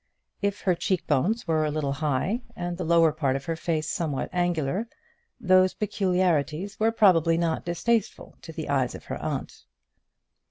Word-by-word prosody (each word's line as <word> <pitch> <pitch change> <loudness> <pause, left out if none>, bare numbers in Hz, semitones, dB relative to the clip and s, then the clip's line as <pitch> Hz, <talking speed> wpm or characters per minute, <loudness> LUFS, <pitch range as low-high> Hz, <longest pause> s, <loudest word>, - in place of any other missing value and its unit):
If 200 0 -1
her 185 - +2
cheek 185 +1 -1
bones 205 - 0
were 160 -1 +2
a 155 - 0
little 150 -2 -1
high, 150 - -1
and 175 0 -3
the 180 - -4
lower 165 -1 +4
part 145 -4 0
of 135 - -4
her 165 - -2
face 160 -2 -2
somewhat 150 -3 -2
angular, 175 +3 0 0.5
those 185 -4 +4
peculiarities 185 -3 0
were 220 +1 +3
probably 170 -7 +4
not 165 -1 -1
distasteful 210 +6 -1
to 160 - -9
the 160 -1 -6
eyes 135 -3 0
of - - -11
her - - -5
aunt. - - -4
170 Hz, 165 wpm, -26 LUFS, 155-185 Hz, 0.5 s, lower